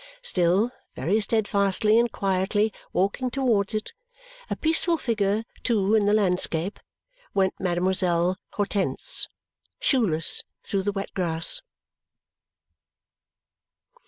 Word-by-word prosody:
Still, 190 - +2 0.2
very 205 +6 +1
steadfastly 210 0 +2
and 235 -1 +1
quietly 195 +2 0 0.2
walking 200 +7 0
towards 235 -6 0
it, 215 - -4 0.6
a - - -1
peaceful 330 +1 +2
figure 215 -5 0 0.2
too 210 -4 +1
in 210 -2 +3
the 205 - +3
landscape, 180 -2 0 0.6
went 190 -1 +2
Mademoiselle 180 0 +1
Hortense, 205 - -1 0.5
shoeless, 195 - +3 0.2
through 195 - -1
the 205 +2 -1
wet 195 0 -5
grass. 170 - +1
200 Hz, 100 wpm, -25 LUFS, 185-220 Hz, 0.6 s, in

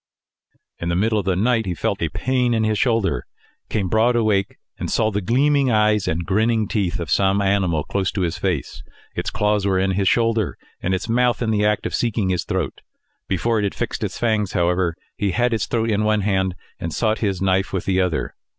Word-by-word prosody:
In 85 - -3
the 85 - 0
middle 110 +3 +2
of 100 - -4
the 95 -2 +1
night 115 +2 +1
he 90 - -2
felt - - -2
a - - 0
pain 125 -2 0
in 110 - +1
his 110 -1 +1
shoulder, 115 - +1 0.4
came 100 -4 -1
broad 110 +5 +3
awake, 105 -4 +1 0.2
and - - -3
saw 110 -1 +1
the 105 0 -1
gleaming 135 +6 +2
eyes 105 -2 +2
and 85 +2 -1
grinning 110 +2 +1
teeth 100 -8 -1
of 85 -3 -4
some 100 0 +3
animal 95 -6 +1
close 95 -2 -1
to 100 - -2
his 85 -2 0
face. 90 -9 -2 0.3
Its - - -2
claws 105 -2 +1
were 95 -1 +2
in 95 +1 +1
his 95 0 0
shoulder, 115 -3 +1 0.2
and 95 +1 0
its 95 +5 -4
mouth 120 -1 +2
in 110 - 0
the 105 -1 +1
act 105 0 +1
of - - -3
seeking 110 -5 0
his 90 -2 -1
throat. - - -3 0.5
Before 110 +4 0
it - - -1
had 100 - -1
fixed - - -3
its - - -3
fangs, 110 -4 0
however, 90 -1 +1 0.2
he 100 -6 0
had 120 +2 +1
its 110 - -1
throat 115 -1 0
in 105 0 +1
one 105 -1 +2
hand, 95 -2 0 0.2
and 85 - -4
sought 110 +6 0
his 100 -4 -1
knife 95 0 +1
with 95 -3 -2
the 95 -1 +2
other. 90 -3 -1
105 Hz, 220 wpm, -21 LUFS, 95-110 Hz, 0.5 s, broad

